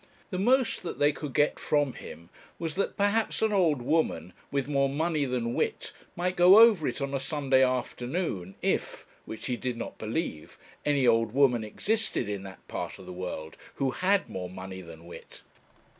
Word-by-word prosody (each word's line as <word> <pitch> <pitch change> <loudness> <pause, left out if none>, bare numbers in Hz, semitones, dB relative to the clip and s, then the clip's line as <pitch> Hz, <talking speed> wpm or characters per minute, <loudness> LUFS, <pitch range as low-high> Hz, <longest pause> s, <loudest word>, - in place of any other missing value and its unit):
The 185 - -2
most 255 +5 +2
that 175 - -5
they 145 +1 +4
could 145 -2 -7
get 145 0 +2
from 145 -3 +1
him 85 +2 -11 0.3
was, 165 -2 -3
that 195 - -2
perhaps 205 +2 +1
an 220 -1 +2
old 160 -10 +2
woman, 120 - 0 0.2
with 140 -1 -1
more 140 -2 +2
money 155 +1 0
than 120 -2 -2
wit, - - -2 0.2
might 180 +1 -1
go 180 +3 +8
over 220 -9 +7
it - - -3
on 140 0 -2
a 135 - 0
Sunday 135 -2 +2
afternoon, 125 - -2
if - - -1 0.2
which 110 - -7
he 125 - -1
did 125 -1 -3
not 115 - -7
believe 110 - -4 0.3
any 140 -3 +3
old 115 -2 +3
woman 130 -4 +3
existed, 210 - -1
in 100 -2 -3
that 95 0 -12
part - - -5
of - - -12
the - - -8
world, 90 -3 -6 0.2
who 135 -1 0
had 195 +7 +1
more 90 -1 -5
money 95 0 -8
than 85 -1 -12
wit. 85 - -12
135 Hz, 185 wpm, -28 LUFS, 110-170 Hz, 0.3 s, go